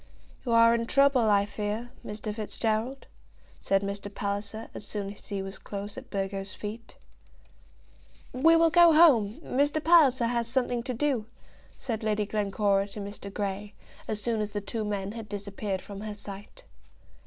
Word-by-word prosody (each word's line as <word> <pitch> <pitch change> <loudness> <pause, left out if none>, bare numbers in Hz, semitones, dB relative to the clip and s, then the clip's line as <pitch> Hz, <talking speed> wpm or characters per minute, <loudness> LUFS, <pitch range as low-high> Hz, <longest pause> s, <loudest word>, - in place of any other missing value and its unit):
"You 245 - -2
are 230 0 +7
in 230 0 0
trouble, 275 -4 +4
I 200 -1 +4
fear, 210 +3 -4
Mr. 210 0 -5
Fitzgerald," 220 +4 -2 0.5
said 195 0 +1
Mr. 200 0 -4
Palliser, 205 +2 -4
as - - -7
soon 200 -1 -4
as 200 - -16
he 200 -2 -3
was 195 0 -7
close 200 0 -6
at - - -9
Burgo's 195 0 -3
feet. 220 +2 -7 1.4
"We 320 +6 +5
will 330 0 +5
go 345 -1 +7
home. 265 -9 +5
Mr. 290 +4 +1
Palliser 300 -7 +5
has 235 0 0
something 245 -1 0
to 250 +1 -4
do," 250 -4 0 0.5
said 230 -4 -3
Lady 215 -1 0
Glencora 200 -1 +1
to 205 - -8
Mr. 200 0 -7
Grey, 200 0 -4 0.3
as 215 - -2
soon 225 0 -1
as 210 - -2
the 205 - -1
two 215 +2 -4
men 200 -2 -3
had 225 -1 -8
disappeared 200 -1 -4
from 200 -1 -8
her 215 -1 -5
sight. 205 - -10
215 Hz, 165 wpm, -28 LUFS, 200-240 Hz, 1.4 s, are